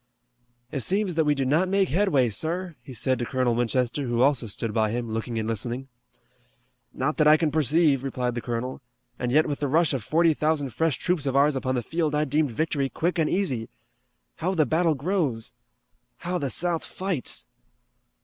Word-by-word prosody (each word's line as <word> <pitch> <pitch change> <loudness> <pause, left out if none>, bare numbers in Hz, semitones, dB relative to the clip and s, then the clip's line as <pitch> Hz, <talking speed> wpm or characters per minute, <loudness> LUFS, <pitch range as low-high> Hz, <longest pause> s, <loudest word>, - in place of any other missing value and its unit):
"It 140 - -2
seems 195 - 0
that 160 -1 +1
we 150 0 +3
do 135 -1 -1
not 160 +8 +2
make 195 -1 +2
headway, 145 - +2
sir," 170 - -3
he - - -12
said 130 +1 0
to 120 - -1
Colonel 130 -2 +1
Winchester, 125 +3 0
who 120 +1 +2
also 135 -4 +3
stood 105 +1 -3
by 110 -1 +2
him, 120 0 -3
looking 115 +1 -3
and 110 -1 -2
listening. 120 +4 -3 1.0
"Not 145 +4 -2
that 155 - +4
I 155 +1 +7
can 155 -2 0
perceive," 150 -2 +3
replied 125 -2 -2
the 120 - -4
colonel, 120 +3 -4 0.4
"and 125 -1 -1
yet 155 +4 +4
with 145 - -3
the 145 - -1
rush 160 +2 +2
of 130 -5 -2
forty 165 0 +3
thousand 150 -3 0
fresh 160 +2 +1
troops 170 -6 -1
of 135 - -1
ours 140 +1 +4
upon 130 0 -1
the 120 - -1
field 160 +2 -1
I 150 +1 +1
deemed 150 +1 +1
victory 140 +2 -1
quick 170 +4 -1
and 155 - +2
easy. 135 - -1 0.7
How 185 +4 -1
the 155 -3 +3
battle 160 0 +2
grows! 145 - -2 0.6
How 180 +1 -3
the 140 - -2
South 170 +3 +1
fights!" 185 -8 -3
145 Hz, 195 wpm, -25 LUFS, 125-165 Hz, 1.0 s, I